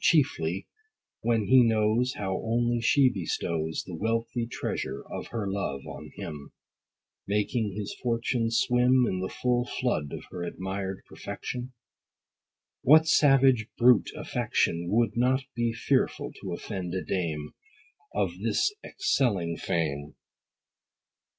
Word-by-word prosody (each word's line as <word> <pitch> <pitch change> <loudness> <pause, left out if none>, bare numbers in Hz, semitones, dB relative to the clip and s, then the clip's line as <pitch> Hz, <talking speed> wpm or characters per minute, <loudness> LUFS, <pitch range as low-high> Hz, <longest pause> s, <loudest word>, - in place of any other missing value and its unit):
chiefly, 95 - +2 0.5
when 115 -2 +1
he 130 +2 +7
knows 115 +2 +2
How 95 -2 -2
only 120 +1 +1
she 135 +4 +5
bestows 80 -4 -2
The 90 - -8
wealthy 115 +4 -1
treasure 70 - -4
of - - -6
her 115 -3 -3
love 95 -9 -3
on - - -8
him; 75 -4 -7 0.7
Making 105 0 0
his 105 -1 -4
fortune 115 -1 0
swim 125 +2 +3
In 95 - -1
the 95 0 -2
full 125 -1 0
flood 120 - -2
of - - -6
her 90 - -6
admired 95 +2 -4
perfection? 125 +1 -6 1.1
What 155 +4 +7
savage, 135 -7 +5
brute 125 -1 +5
affection, 85 +1 0
Would 115 +3 +2
not 130 +3 +2
be 120 -1 +1
fearful 130 +3 0
to 95 - -5
offend 90 0 -4
a 95 - -2
dame 80 -5 -2 0.6
100 - - 0
Of - - -15
this 410 - +1
excelling 100 - 0
frame 75 -4 -2
115 Hz, 125 wpm, -28 LUFS, 90-125 Hz, 1.1 s, he